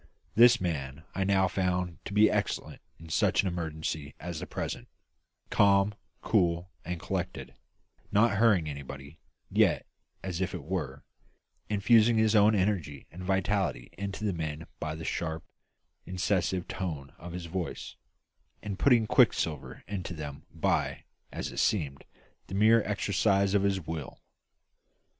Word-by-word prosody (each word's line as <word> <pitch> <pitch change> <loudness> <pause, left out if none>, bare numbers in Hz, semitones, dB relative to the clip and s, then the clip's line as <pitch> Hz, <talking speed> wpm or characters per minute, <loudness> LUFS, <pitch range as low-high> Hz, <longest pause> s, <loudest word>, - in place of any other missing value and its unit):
This 120 +1 +7
man 75 -5 -3
I 95 - 0
now 95 -1 +3
found 90 -3 -1
to 100 - -6
be 105 +1 +7
excellent - - -2 0.2
in 80 0 -12
such 80 - +2
an - - -1
emergency 80 -4 -4
as 85 0 -5
the - - -6
present; - - -4 0.6
calm, 100 0 +4 0.3
cool, 90 -3 +1
and 90 0 -4
collected; - - -4 0.6
not 105 0 +4
hurrying 100 -7 +4
anybody, 70 +1 -8 0.3
yet, - - +3 0.4
as 90 -1 -3
it 95 - -1
were, 75 -6 -4 0.7
infusing 110 +2 +4
his 110 0 +3
own 105 +1 +6
energy 95 -8 -1
and 90 - -9
vitality 95 -7 0
into 100 +2 -5
the 105 -3 +1
men 80 -1 -4
by 75 0 -3
the 80 0 -7
sharp, 80 -1 -2 0.6
incisive 90 0 0
tones 75 -8 -4
of 85 0 -8
his 90 -1 -5
voice, 85 +1 -5 0.7
and 100 -2 -5
putting 120 -5 +5
quicksilver 75 -10 +2
into 95 -3 -4
them 75 -1 -7
by 80 - 0 0.3
as - - -4
it - - -10
seemed 70 -10 0 0.4
the 95 - -5
mere 110 +3 +6
exercise 100 -1 +1
of 100 - +4
his 100 -1 +1
will. 80 -4 -6
90 Hz, 140 wpm, -29 LUFS, 80-100 Hz, 0.7 s, This